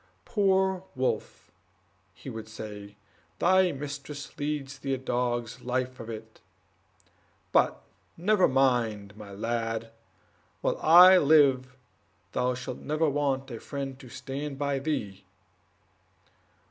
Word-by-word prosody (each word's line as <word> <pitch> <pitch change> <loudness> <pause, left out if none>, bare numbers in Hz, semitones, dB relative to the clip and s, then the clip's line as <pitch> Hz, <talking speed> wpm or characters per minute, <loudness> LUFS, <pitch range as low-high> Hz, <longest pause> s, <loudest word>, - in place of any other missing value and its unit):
"Poor 190 -3 +2
Wolf," 130 0 -3 0.6
he - - -14
would 110 -3 -6
say, 105 -2 -8 0.4
"thy 185 - +4
mistress 140 0 -7
leads 145 -1 -3
thee 135 -1 -1
a - - -5
dog's 120 -1 -2
life 130 +1 -2
of 115 - -8
it; 110 0 -9 1.1
but - - +2 0.3
never 190 +3 +3
mind, 115 -6 +1
my 105 -1 -11
lad, 115 +2 -3 0.7
whilst - - -1
I 180 +3 +9
live 135 -4 +4 0.5
thou 125 0 0
shalt 125 0 -6
never 155 +2 0
want 140 -2 -1
a 115 - -6
friend 135 0 -6
to 130 - -12
stand 140 +3 -6
by 140 -1 -1
thee!" 120 -10 -3
135 Hz, 115 wpm, -28 LUFS, 115-145 Hz, 1.1 s, I